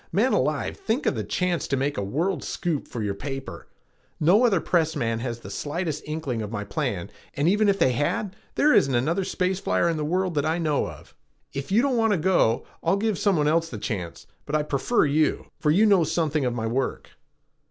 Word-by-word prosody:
"Man - - +2
alive, - - 0
think 295 - -1
of - - +2
the 110 -5 -3
chance 170 - -1
to 135 - 0
make 140 +2 -1
a - - -2
world 160 - -1
scoop 170 -6 -2
for 115 - -5
your 100 -1 -1
paper! 135 +5 -7 0.5
No 185 +10 +5
other 200 -7 +3
press 160 -1 +1
man 115 -5 -1
has 120 -1 -4
the - - -9
slightest 155 0 -3
inkling 150 -7 -3
of 105 -1 -5
my 105 -2 -3
plan 100 - -3 0.2
and 145 +3 +1
even 205 +3 +3
if 195 - +2
they 130 - +3
had, 150 - -1 0.2
there 300 +1 +4
isn't 135 -2 +4
another 165 +10 +1
space 185 0 -1
flyer 170 - +1
in 165 -1 0
the 150 - -2
world 180 +3 0
that 145 -2 0
I 160 +2 0
know 155 -4 0
of. - - -12 0.4
If 140 +5 -5
you 225 +5 +4
don't 270 -3 +1
want 225 -2 +3
to - - +2
go, 160 -9 +2 0.2
I'll 170 +4 +2
give 215 -1 0
some 200 -4 +2
one 150 -1 +2
else 165 +2 +2
the - - -6
chance, 90 -8 -5 0.2
but 150 - -1
I 150 - +2
prefer 150 - +1
you, 150 +2 +1
for 150 - +1
you 190 +8 +5
know 200 -5 +5
something 155 -3 0
of 120 -1 -1
my 115 -2 -2
work." 125 +3 -2
155 Hz, 225 wpm, -25 LUFS, 135-185 Hz, 0.5 s, No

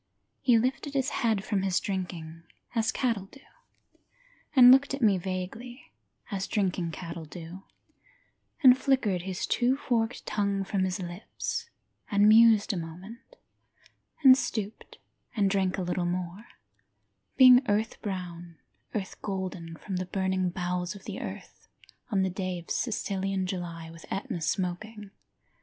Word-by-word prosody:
He 245 -3 +4
lifted 265 +4 -1
his 270 0 +1
head 220 -4 +1
from 205 -4 0
his 190 -2 +1
drinking, 175 -4 -5 0.3
as 225 -2 +1
cattle 230 -7 -1
do, 275 +7 -17 1.1
And 250 -2 +10
looked 270 +1 +5
at 275 - -10
me 200 -4 +4
vaguely, 195 +8 -6 0.4
as 195 -1 -2
drinking 185 -4 0
cattle 165 0 -7
do, 170 +3 -9 1.0
And 255 -2 +9
flickered 255 -9 +1
his 185 0 -3
two 250 +2 +2
forked 235 -4 -1
tongue 200 -1 0
from 190 -1 0
his 185 +1 -2
lips, 180 - -5 0.4
and 205 0 +4
mused 220 -1 +6
a - - -2
moment, 185 - -9 0.9
And 260 -2 +10
stooped 215 -5 -4 0.4
and 200 -3 +2
drank 190 -2 +1
a 190 - -2
little 180 0 -1
more, 180 +4 -4 0.9
Being 255 -1 +9
earth 215 +2 0
brown, 175 -4 -6 0.4
earth 195 -3 -4
golden 185 -4 -4
from 190 +3 -5
the 185 0 -3
burning 190 -1 0
bowels 180 +1 -3
of 195 - -12
the - - -6
earth - - -9 0.4
On 195 -4 +1
the 190 - 0
day 185 -1 -3
of 170 - -9
Sicilian 195 -4 -1
July, 170 -3 -5
with 165 0 -13
Etna 190 -3 -3
smoking. 195 +5 -3
195 Hz, 140 wpm, -28 LUFS, 180-225 Hz, 1.1 s, And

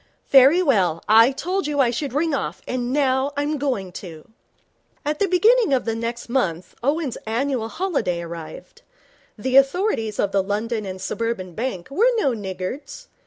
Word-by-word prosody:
Very 280 +7 +7
well, 185 - +1
I 225 +4 +6
told 360 +5 -2
you 295 -1 -2
I 250 -3 +4
should 275 +4 -3
ring 305 +4 0
off, 275 - -3
and 250 -1 -2
now 270 0 +1
I'm 290 +1 -1
going 245 -10 -2
to.' 165 -4 -10 0.8
At 300 +1 -1
the 400 - +2
beginning 405 - +4
of 255 - -2
the 225 - -1
next 235 +1 -4
month 185 -9 -1
Owen's 285 +1 -1
annual 240 0 -1
holiday 230 - -2
arrived. 165 -1 -9 0.6
The 255 +5 +1
authorities 275 - +2
of 200 - 0
the 195 - +2
London 210 +2 -2
and 190 0 -6
Suburban 195 -4 -3
Bank 225 -1 -4
were 445 - +3
no 280 -12 +2
niggards. 215 - -6
255 Hz, 165 wpm, -22 LUFS, 205-290 Hz, 0.8 s, Very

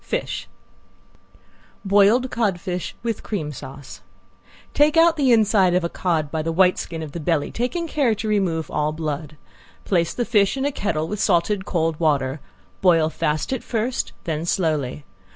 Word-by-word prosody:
FISH - - -3 1.4
~BOILED 205 +6 +4
CODFISH, 180 -5 -2
WITH 230 -2 -2
CREAM 160 -9 -4
SAUCE~ 135 -1 -10 0.7
Take 300 +2 +3
out 330 0 +6
the 275 -5 +2
inside 210 -5 +4
of 180 - +2
a 170 - -1
cod 160 -6 -1
by 160 - -1
the 165 +1 -2
white 180 +2 +3
skin 165 -2 -5
of 150 - -7
the 170 - -6
belly, 155 -2 0
taking 255 +9 -2
care 275 -8 +1
to 215 - -4
remove 180 -7 0
all 150 +1 0
blood. 155 -1 -4 0.5
Place 170 -4 +1
the 240 - -1
fish 210 0 +2
in 270 - -1
a 285 - +1
kettle 160 - -2
with 210 +3 -4
salted 190 0 +1
cold 165 -2 -1
water; 145 -3 +1 0.4
boil 165 -4 +4
fast 150 - -1
at 260 - -2
first, 235 +2 -2
then 160 -2 -2
slowly. 155 -6 -1
180 Hz, 165 wpm, -22 LUFS, 155-220 Hz, 1.4 s, out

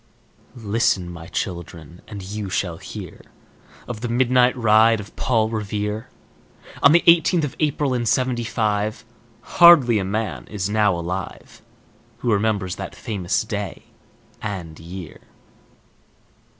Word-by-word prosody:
Listen, 105 -5 0
my 85 -1 -10
children, 85 -4 -6
and 100 -2 -8
you 100 +1 -5
shall 90 -3 -2
hear - - -9 0.7
Of 115 -3 -6
the 120 - -2
midnight 125 +1 +3
ride 115 -1 +4
of 105 0 -10
Paul 110 -3 +1
Revere, 105 0 -3 0.7
On 140 - +7
the 170 +2 +5
eighteenth 170 0 +5
of 150 -1 -3
April, 145 -3 0
in 120 -2 -1
Seventy 125 -1 +1
five; 110 -1 -1 0.4
Hardly 150 - +6
a - - -1
man 105 +3 -3
is 100 -3 -3
now 105 -3 +3
alive 90 +2 -6 0.6
Who 120 -3 0
remembers 100 -3 0
that - - -7
famous 95 -5 -2
day 105 -3 -5 0.6
and 90 -7 -6
year. 85 +1 -9
110 Hz, 125 wpm, -22 LUFS, 95-120 Hz, 0.7 s, On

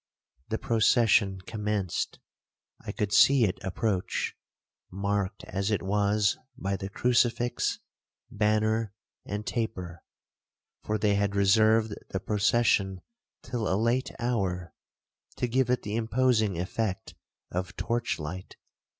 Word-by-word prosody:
The 110 - 0
procession 110 -4 +3
commenced. 105 -2 -2 0.7
I - - -4
could 105 -1 -2
see 135 +4 +6
it 95 -4 -1
approach, 95 0 -1 0.6
marked 100 +1 -2
as 95 +1 -2
it 105 -5 0
was 100 +1 +1 0.2
by 100 -4 -2
the 95 0 -5
crucifix, 120 +2 +1 0.5
banner, 110 0 +1 0.3
and 105 +1 -4
taper—(for 105 0 -6
they 105 -1 +2
had 100 0 0
reserved 110 +2 +4 0.2
the 95 - -2
procession 100 -2 +2 0.4
till 120 -4 -2
a 95 - +2
late 115 +4 +1
hour, 95 -8 -2 0.6
to 125 - -1
give 125 +1 +1
it 125 - +1
the 105 +1 -3
imposing 115 -4 +2
effect 95 +2 -3 0.4
of 90 +1 -3
torch 120 0 -1
light.) 85 +4 -7
105 Hz, 115 wpm, -28 LUFS, 95-115 Hz, 0.7 s, see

